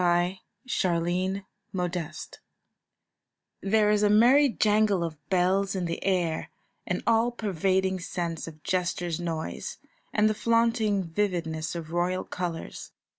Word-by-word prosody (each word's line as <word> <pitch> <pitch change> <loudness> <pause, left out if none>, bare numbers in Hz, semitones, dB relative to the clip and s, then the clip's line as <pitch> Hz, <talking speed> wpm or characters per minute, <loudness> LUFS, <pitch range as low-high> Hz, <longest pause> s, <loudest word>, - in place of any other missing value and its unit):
A 175 +2 +2 0.3
CARNIVAL 185 -1 0 0.4
JANGLE 175 -3 -2 1.5
There 210 +1 +3
is 210 -1 +3
a 210 - +4
merry 250 +7 +6
jangle 210 -5 +2
of 155 -3 -7
bells 190 +2 +2
in 185 -2 -1
the 170 0 -3
air, 175 -4 0 0.4
an - - -2
all 230 +1 +3
pervading 190 -4 0
sense 170 -2 -4
of 155 -2 -11
jester's 175 -2 -1
noise, 165 -2 -4 0.3
and 210 0 +3
the 215 - +2
flaunting 230 -2 +2
vividness 165 -3 -2
of 165 -2 -6
royal 175 +2 0
colours. 175 -2 -5
185 Hz, 125 wpm, -27 LUFS, 170-210 Hz, 1.5 s, merry